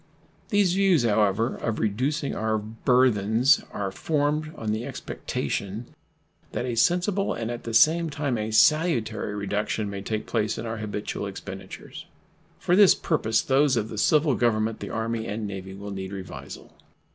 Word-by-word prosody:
These 205 -4 +3
views, 190 -7 +3
however, 110 +1 +2
of 115 -2 -2
reducing 135 +8 -1
our 110 0 0
burthens 115 +2 +2
are 100 -2 -3
formed 150 +6 -1
on 110 -1 -3
the 110 +2 -2
expectation 110 +2 -4 0.6
that 120 - -2
a 125 - -2
sensible 180 - +1
and 115 +1 -3
at 120 - -7
the 115 - -4
same 165 +7 +5
time 145 -3 -2
a 110 -1 -2
salutary 110 -6 +2
reduction 105 +1 -2
may 100 -1 -5
take 110 +2 -3
place 110 -2 -1
in - - -5
our 115 0 -4
habitual 105 -1 -4
expenditures. - - -9 0.5
For 175 - +1
this 200 -1 +7
purpose 110 -9 0
those 135 -1 +3
of 110 -1 -1
the 110 - -7
civil 150 +3 +3
Government, 115 -2 +1
the - - -6
Army, 115 0 -2
and 105 +1 -3
Navy 95 -1 -6
will 100 +1 -7
need 95 0 -6
revisal. 95 -1 -9
115 Hz, 155 wpm, -25 LUFS, 105-145 Hz, 0.6 s, this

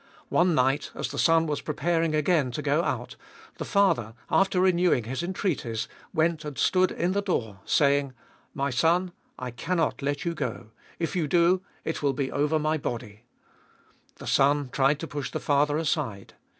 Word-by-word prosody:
One 175 -1 +3
night, 135 +2 +1
as - - -3
the - - -5
son 165 -1 +4
was 150 -2 -2
preparing 165 +1 0
again 150 -3 +2
to 150 - -4
go 145 +3 +2
out, - - -3 0.4
the - - -3
father, 125 - +2 0.2
after 195 -1 +3
renewing 180 -8 +3
his 130 +6 -4
entreaties, 175 - -2 0.2
went 160 -1 +1
and 150 -2 -7
stood 185 0 +3
in 175 +2 -1
the 200 +1 +1
door, 110 - -2
saying, 140 -3 +2 0.2
" - - -35
My 140 - -1
son, 170 +8 +2 0.3
I 125 -1 -5
cannot 165 +7 -1
let 145 +2 -2
you 170 - 0
go 120 -7 -5
— - - -28
if 170 +3 -2
you 165 -4 0
do, 175 +4 +3 0.2
it 160 - -3
will 140 -2 +1
be 135 0 -2
over 150 +2 +1
my 155 +1 0
body." 115 -4 -6 0.9
The - - -11
son 140 0 +2
tried 140 +1 +2
to 165 - -4
push 145 -2 -4
the - - -4
father 145 +1 +2
aside. 150 - -2
150 Hz, 180 wpm, -27 LUFS, 135-170 Hz, 0.9 s, son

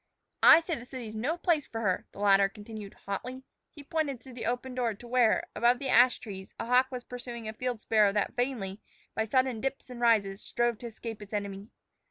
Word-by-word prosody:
"I 330 - +9
say 335 +1 -3
the 245 -6 -5
city's 250 -4 -7
no 255 +10 -1
place 330 -4 +1
for 225 - -5
her," 185 -4 0
the - - -17
latter 195 -1 +5
continued 210 0 -9
hotly. 250 +7 -5 0.3
He 290 - -12
pointed 285 -3 -2
through 260 +1 -13
the 235 -2 -4
open 250 +2 -2
door 240 -4 -1
to 240 +4 -13
where, 240 -2 +3
above 240 +1 +4
the 270 +1 -4
ash 245 0 +6
trees, 190 -3 -9
a - - -2
hawk 250 +2 +4
was 250 -2 -6
pursuing 240 -2 -7
a 220 - -4
field 245 -1 -3
sparrow 215 -2 +4
that 205 +3 0
vainly, 230 -6 -2 0.3
by 220 - 0
sudden 255 0 +1
dips 270 -1 -4
and 245 -1 -8
rises, 210 -4 +3
strove 240 -2 0
to 240 - -6
escape 225 -1 -7
its 205 +1 -11
enemy. 200 0 -4
235 Hz, 215 wpm, -29 LUFS, 210-255 Hz, 0.3 s, I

